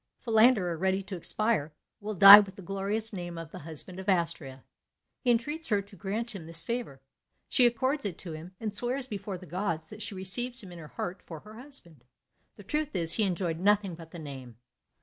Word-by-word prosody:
Philander, 220 -6 +3
ready 190 +3 0
to 195 0 -7
expire, 175 -4 +1 0.3
will 215 0 -5
die 195 +3 +12
with 200 -2 -3
the 195 - -11
glorious 200 +4 -3
name 175 -3 -6
of 165 -1 -8
the - - -9
husband 165 +4 -3
of 190 +1 -5
Astrea. 155 -7 -1 0.6
He 250 - -2
entreats 295 +8 0
her 205 -3 +2
to 200 0 -17
grant 215 +5 -3
him 170 -5 -9
this 165 0 +4
favour; 230 - -4 0.5
she 245 - +4
accords 260 +5 -1
it 190 -5 -4
to 175 - -9
him, 165 +4 -9
and 215 -2 -4
swears 250 +4 +1
before 205 -5 -6
the 185 - -12
gods 170 -3 -3
that 215 +1 -10
she 205 -1 -4
receives 240 +7 0
him 185 - -11
in 175 - -10
her 155 - -10
heart 175 +5 -6
for 160 -3 -10
her 215 - -14
husband. 220 - -12 0.5
The 205 - -13
truth 300 +7 -3
is, 165 -1 +4
he 220 - +3
enjoyed 175 -3 -2
nothing 200 -1 +2
but 165 -1 -11
the 170 - -10
name. 135 -7 -9
195 Hz, 210 wpm, -29 LUFS, 170-220 Hz, 0.6 s, die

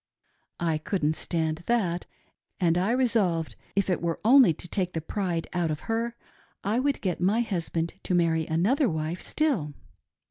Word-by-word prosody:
I 165 -2 0
couldn't 155 -2 0
Stand 160 -2 -1
that, 185 -8 0 0.5
and 170 -2 +3
I 185 +4 +1
resolved, 220 -10 +1 0.2
if 200 -1 +2
it 180 - 0
were 170 -1 -1
only 255 -5 +7
to 165 +3 -6
take 180 0 -1
the 160 - -1
pride 170 0 -2
out 175 -2 0
of 155 0 -3
her, 230 +1 -2 0.5
I 210 +5 +1
would 280 +1 0
get 180 -3 -2
my 205 +6 +3
husband 170 -6 -2
to 180 - +1
marry 165 -2 +2
another 220 - +2
wife 160 +2 -3
still. 215 - 0
180 Hz, 165 wpm, -27 LUFS, 165-225 Hz, 0.5 s, only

